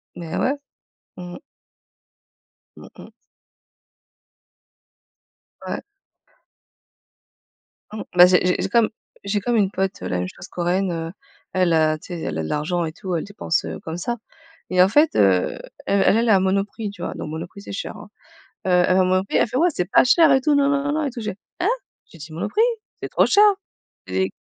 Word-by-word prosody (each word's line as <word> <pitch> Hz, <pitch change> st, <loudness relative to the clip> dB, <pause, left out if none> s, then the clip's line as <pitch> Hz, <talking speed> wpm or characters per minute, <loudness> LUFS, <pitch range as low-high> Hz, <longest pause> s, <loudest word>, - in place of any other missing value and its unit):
Mais 170 Hz, -2 st, -6 dB
ouais. 280 Hz, +2 st, +1 dB, 0.6 s
Mmh. 175 Hz, -1 st, -8 dB, 1.4 s
Mmh -, -, -12 dB
mh. -, -, -11 dB, 2.6 s
Ouais. -, -, -4 dB, 2.1 s
Mmh 215 Hz, -, -5 dB
bah 180 Hz, -, +11 dB
j'ai 180 Hz, 0 st, +5 dB, 0.2 s
j'ai -, -, -1 dB
comme 230 Hz, 0 st, +3 dB, 0.3 s
j'ai 200 Hz, +1 st, 0 dB
comme 235 Hz, +4 st, -1 dB
une 200 Hz, -3 st, +2 dB
pote, 190 Hz, 0 st, -2 dB
la 90 Hz, -, -2 dB
même 90 Hz, -, -2 dB
chose 180 Hz, -, -11 dB
Corréenne, 180 Hz, +1 st, -1 dB
heu, 165 Hz, -1 st, -4 dB, 0.4 s
elle 180 Hz, -2 st, +2 dB
heu 155 Hz, -1 st, +3 dB
tu -, -, -14 dB
sais, 165 Hz, -, -6 dB
elle 80 Hz, -, -3 dB
a 80 Hz, -, -2 dB
de -, -, -5 dB
l'argent 170 Hz, +4 st, -1 dB
et 155 Hz, -, -4 dB
tout, 180 Hz, +1 st, -4 dB
elle 160 Hz, -, -1 dB
dépense, 205 Hz, -5 st, -2 dB
heu, -, -, -6 dB
comme 160 Hz, +1 st, -6 dB
ça 240 Hz, +7 st, -3 dB, 0.5 s
et 180 Hz, 0 st, +4 dB
en 185 Hz, -, +3 dB
fait, 295 Hz, +8 st, +3 dB
heu, 95 Hz, -3 st, +3 dB, 0.3 s
elle 200 Hz, 0 st, +2 dB
elle 235 Hz, +1 st, +1 dB
est 220 Hz, -, +5 dB
à 195 Hz, -, +6 dB
Monoprix, 200 Hz, +3 st, -1 dB
tu 205 Hz, -, -12 dB
vois, -, -, -3 dB
donc -, -, -6 dB
Monoprix 170 Hz, +5 st, -7 dB
c'est -, -, -9 dB
cher, 195 Hz, -, -5 dB
hein, -, -, -12 dB, 0.6 s
heu -, -, +1 dB
elle 180 Hz, 0 st, +4 dB
va 190 Hz, -, +4 dB
à -, -, +2 dB
Monoprix 185 Hz, +1 st, +1 dB
elle -, -, +4 dB
fait: 255 Hz, -, -4 dB
«Ouais 345 Hz, +4 st, +4 dB
c'est 180 Hz, -, 0 dB
pas -, -, +6 dB
cher 295 Hz, +3 st, +5 dB
et 265 Hz, -, +4 dB
tout 295 Hz, +2 st, +2 dB
na 280 Hz, -1 st, +3 dB
na 280 Hz, 0 st, +1 dB
na 285 Hz, -, 0 dB
na 310 Hz, -1 st, 0 dB
et -, -, -2 dB
tout» 240 Hz, -1 st, -7 dB
je 215 Hz, -, -3 dB
fais: 190 Hz, -, -9 dB, 0.2 s
«Hein?» 360 Hz, -, +2 dB, 0.4 s
j'ai -, -, -17 dB
dit: 155 Hz, +1 st, -10 dB
«Monoprix, 405 Hz, -, 0 dB, 0.4 s
c'est -, -, -4 dB
trop -, -, +3 dB
cher» 415 Hz, +1 st, +5 dB, 0.6 s
et 95 Hz, 0 st, -1 dB
190 Hz, 195 wpm, -22 LUFS, 170-230 Hz, 2.6 s, bah